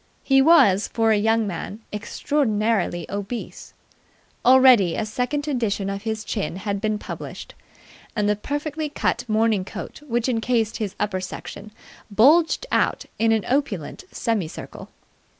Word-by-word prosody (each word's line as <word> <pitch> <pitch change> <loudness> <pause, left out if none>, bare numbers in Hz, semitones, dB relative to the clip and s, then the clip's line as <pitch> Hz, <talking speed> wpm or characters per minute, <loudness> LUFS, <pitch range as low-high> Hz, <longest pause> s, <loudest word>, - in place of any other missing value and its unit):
He 270 -1 +4
was, 240 - +5
for 225 -1 +1
a - - +5
young 220 +2 +2
man, 200 +3 -5
extraordinarily 215 - 0
obese. 205 +4 -6 0.7
Already 250 -8 +6
a 220 - -1
second 255 +7 -2
edition 215 -8 -1
of 195 0 -5
his 220 0 -3
chin 200 -7 -3
had 200 +1 -3
been 215 -1 0
published, - - -8 0.6
and 210 -1 +1
the 210 - +2
perfectly 295 +6 -3
cut - - -1
morning 220 -2 +2
coat 195 - -8
which 240 -1 0
encased 230 -2 0
his 210 -3 -4
upper 195 -3 -1
section 200 +2 -8 0.4
bulged 305 - +4
out - - +1
in 225 0 +3
an 220 -2 +1
opulent 260 - -2
semi 220 -8 -1
circle. - - -10
220 Hz, 140 wpm, -23 LUFS, 205-255 Hz, 0.7 s, Already